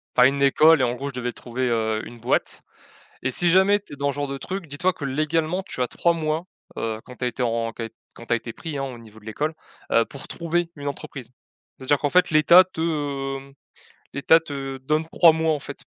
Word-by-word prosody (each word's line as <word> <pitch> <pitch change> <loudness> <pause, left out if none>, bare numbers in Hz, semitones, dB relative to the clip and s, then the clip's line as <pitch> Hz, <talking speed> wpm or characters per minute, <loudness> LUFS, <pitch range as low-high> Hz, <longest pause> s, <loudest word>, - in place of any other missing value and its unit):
Enfin, 125 0 +7
une 140 +1 -1
école 155 +2 +6
et - - +3
en 120 -1 +1
gros, 140 +2 -4
je - - -10
devais 125 -1 -3
trouver, 125 +2 -3
heu, 110 -1 0
une 120 -1 -11
boîte 120 +3 -1 0.6
et 130 - 0
si 175 +7 +1
jamais 190 +3 +5
tu 170 - -11
es - - -13
dans 140 0 0
ce - - -11
genre 145 -1 -2
de 140 - -4
truc, 190 +4 -5
dis-toi 160 +6 0
que 145 - -8
légalement 155 +6 0
tu 185 - -7
as 125 - 0
3 170 - +1
mois, 160 0 -2 0.3
heu, 110 -1 -3
quand 125 - -12
tu - - -4
as - - +2
été 125 - -4
en 115 -1 -1
qu 115 -1 -5 0.3
quand 115 - -12
tu - - -3
as - - +5
été 115 0 -7
pris, 155 +1 -6
hein, 135 - -1
au 125 -3 -7
niveau 110 -1 -15
de - - -21
l'école, 150 +9 -3 0.4
heu, 115 - +5
pour 140 +3 -11
trouver 170 0 -1
une 145 -1 -4
entreprise. 130 -3 -7 0.5
C'est-à-dire 135 +2 +1
qu'en 145 - -1
fait 180 +1 +4
l'Etat 170 +4 +7
te, 180 -3 -9 0.6
hem, 135 0 -14 0.6
l'Etat 150 +4 +5
te 135 -4 -6
donne 155 +4 -1
3 170 -2 +7
mois 160 0 +1
en 150 - -2
fait, - - -9
140 Hz, 240 wpm, -23 LUFS, 125-160 Hz, 0.6 s, Enfin